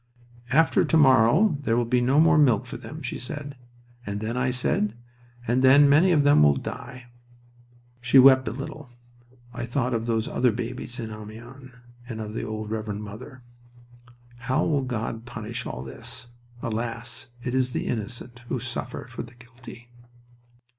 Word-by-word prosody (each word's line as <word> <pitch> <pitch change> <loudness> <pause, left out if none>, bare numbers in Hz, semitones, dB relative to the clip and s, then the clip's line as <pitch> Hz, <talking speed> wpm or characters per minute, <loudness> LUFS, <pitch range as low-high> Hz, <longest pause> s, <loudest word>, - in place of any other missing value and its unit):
"After 135 0 +4
to 165 - +2
morrow 140 - +5
there 115 -4 +1
will 120 - +1
be 125 +1 +1
no 130 +4 +3
more 165 0 +5
milk 125 -8 +4
for - - -8
them," - - -9
she - - -4
said. 140 +3 -6 0.5
"And 100 -2 -4
then?" 110 +2 -3
I 125 +1 0
asked. 125 0 -2
"And 105 +1 +1 0.7
then 140 +2 +7
many 155 +7 +5
of 150 -4 +4
them 145 - +5
will 75 -1 +5
die." 125 - -8 0.9
She 125 +2 +4
wept 130 0 +7
a - - -1
little. 140 +2 -7 0.6
I 120 -1 -5
thought 125 0 -1
of 115 0 -2
those 115 -1 0
other 125 -1 +2
babies 120 +1 -5
in 110 -2 -5
Amiens, 115 +5 -10 0.4
and 110 -2 -5
of 105 -1 -6
the - - -3
old 110 -1 -5
Reverend 105 -1 -4
Mother. 115 +5 -10 0.9
"How 125 +2 0
will 145 -3 +1
God 115 -2 -4
punish 115 -1 -5
all 65 - -6
this? 65 - -7 0.4
Alas! 115 +1 -4 0.2
it 125 - -3
is 130 -1 +1
the - - -3
innocent 120 +2 -5
who - - -2
suffer - - -5
for - - -7
the 120 +1 -11
guilty." 120 0 -14
120 Hz, 165 wpm, -25 LUFS, 115-130 Hz, 0.9 s, then